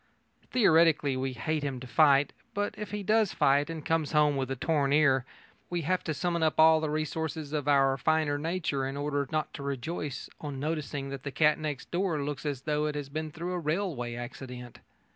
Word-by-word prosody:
Theoretically, 160 - +4
we 130 0 -2
hate 150 +6 -2
him 140 -3 -3
to 130 - -8
fight, 140 +1 +4 0.2
but, 205 0 -1
if 210 -1 -6
he 210 -1 -4
does 215 0 +2
fight 140 +3 +3
and 160 -2 -6
comes 160 -2 0
home 150 -1 +4
with 135 -1 -2
a 135 - -1
torn 140 +1 +1
ear, 135 -4 +4 0.4
we 175 -1 -1
have 180 +4 0
to 160 - -1
summon 170 0 -1
up 155 -1 +1
all 160 0 +7
the 155 - -1
resources 155 0 -3
of 145 -2 -2
our 135 -2 +4
finer 155 0 +1
nature 160 -4 -1
in 135 +1 -5
order 145 -1 -1
not 155 -1 -1
to - - -7
rejoice 140 +1 -4
on 145 -3 -5
noticing 145 -2 -3
that 135 -1 -6
the 140 - -4
cat 150 +2 +3
next 150 -3 -5
door 175 -3 0
looks 145 +1 -4
as 140 -3 -3
though 150 0 0
it 150 - -3
had 140 -1 -5
been 155 0 -3
through 170 +4 -5
a 180 - -1
railway 150 -7 -2
accident. 125 0 -8
150 Hz, 205 wpm, -29 LUFS, 140-160 Hz, 0.4 s, all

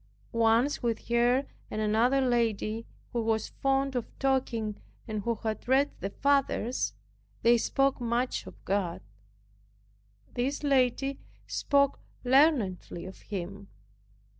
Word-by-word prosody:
Once 230 +5 +3
with 230 -2 -2
her 240 +3 +3 0.2
and 215 - -4
another 225 +6 +3
lady, 230 -3 0 0.3
who 235 - 0
was 220 -1 0
fond 270 0 0
of 240 -2 -1
talking 245 -6 0 0.3
and 215 -2 -3
who 235 +3 0
had 220 0 -3
read 270 +3 +3
"the 195 - -3
fathers," 275 -1 +1 0.5
they 235 +1 +6
spoke 270 +3 +1
much 240 +2 -1
of - - -13
God. 190 -3 -1 1.3
This 270 +5 -1
lady 270 0 +2 0.3
spoke 280 -1 +2 0.2
learnedly 245 - +2
of 190 - -9
Him. 200 0 -6
240 Hz, 115 wpm, -29 LUFS, 220-270 Hz, 1.3 s, they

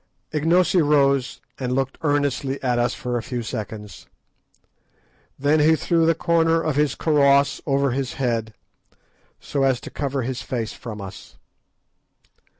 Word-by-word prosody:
Ignosi 170 +4 +3
rose 140 -3 +2 0.2
and 125 -1 -1
looked 135 0 -2
earnestly 145 -2 0
at 125 -2 +1
us 120 +1 0
for 125 -4 -3
a - - -2
few 120 0 -4
seconds. 105 -4 -7 1.3
Then 145 +3 +2
he 155 +2 +5
threw 165 +1 +1
the 165 - +3
corner 165 0 +2
of 155 -3 -1
his 150 -2 +1
karross 140 -2 +3
over 140 -1 +2
his 130 0 -2
head, 115 -4 -2 0.8
so 140 - -3
as 135 -2 +2
to - - -9
cover 140 -3 -2
his 130 +1 -3
face 115 -4 -4
from 110 -4 -8
us. 95 -9 -10
135 Hz, 145 wpm, -22 LUFS, 120-150 Hz, 1.3 s, he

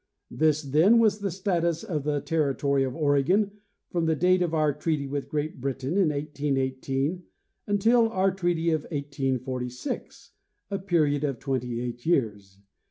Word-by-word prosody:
This, 155 0 +2
then, 155 - +4
was 215 -2 +3
the 200 -1 -2
status 170 -2 -1
of 155 -10 -3
the 145 -1 0
territory 140 -2 +1
of 130 -1 -3
Oregon 160 +7 +2 0.4
from 170 -2 0
the 160 - +2
date 180 +4 +3
of 175 -2 +1
our 155 -2 +2
treaty 155 -2 -1
with 140 0 -4
Great 150 -3 -3
Britain 135 0 -3
in 190 -4 +3
1818 140 +1 -2 0.5
until 225 +3 +3
our 195 -3 +2
treaty 175 -3 0
of 155 -1 +1
1846, 130 -4 -4 0.4
a 195 - -1
period 155 -7 +1
of 140 -4 -1
twenty 125 -2 -2
eight 120 0 -5
years. 105 - 0
150 Hz, 150 wpm, -26 LUFS, 135-175 Hz, 0.5 s, then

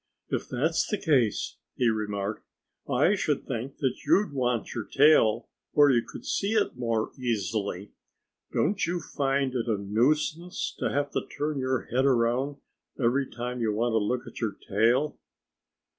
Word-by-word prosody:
"If - - -2
that's 160 +7 +1
the 210 - -1
case," 135 - +1 0.2
he 125 - +2
remarked, 105 -1 -2 0.5
"I - - +3
should - - -1
think 125 +4 -4 0.3
you'd 205 -6 +3
want 125 -4 -1
your 115 -3 -4
tail 135 -6 +4 0.3
where 145 -1 +6
you 120 -2 +3
could - - -11
see 200 +2 0
it 215 -10 +1
more 115 -3 -1
easily. 105 -4 -2 0.6
Don't 205 - +1
you 175 +1 -1
find 135 -3 -1
it 120 -2 -2
a 110 -3 +1
nuisance 150 - 0
to - - 0
have 145 0 -1
to - - -2
turn 150 -1 -3
your 130 -1 0
head 130 +2 +3
around 130 +3 +1 0.4
every 130 +2 +1
time 125 0 -4
you 110 -2 +1
want 115 +2 0
to 110 - +4
look 125 +4 -1
at - - -10
your 105 -4 -2
tail?" 120 +8 +2
125 Hz, 160 wpm, -27 LUFS, 115-145 Hz, 0.6 s, where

